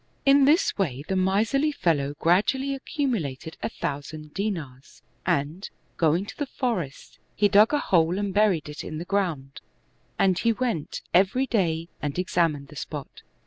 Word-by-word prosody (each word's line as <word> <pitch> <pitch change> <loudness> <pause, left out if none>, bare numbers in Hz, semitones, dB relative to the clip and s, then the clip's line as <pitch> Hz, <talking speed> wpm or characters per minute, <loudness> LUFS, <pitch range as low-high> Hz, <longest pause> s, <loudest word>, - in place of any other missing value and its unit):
In 275 0 +6
this 315 +7 +3
way 140 -8 -1
the 190 - -1
miserly 220 +11 +2
fellow 145 - 0
gradually 240 +12 +2
accumulated 220 - -3
a - - -1
thousand 150 +2 -5
dinars^ 160 -11 -5 0.2
and, 150 +7 -1 0.3
going 165 +3 +2
to - - -9
the 290 - -3
forest, 215 - -4 0.2
he 205 - +4
dug 205 +3 +5
a 295 - +3
hole 175 - +2
and 200 -1 -2
buried 200 -7 +2
it 150 0 -7
in 155 - -6
the 170 - -5
ground, 170 -9 -2 0.6
and 185 -2 +3
he 230 -1 +2
went 230 -11 -3
every 195 +9 +3
day 170 -9 0
and 145 +1 -3
examined 165 -6 0
the 150 - -13
spot. 145 -1 -7
180 Hz, 155 wpm, -25 LUFS, 150-220 Hz, 0.6 s, In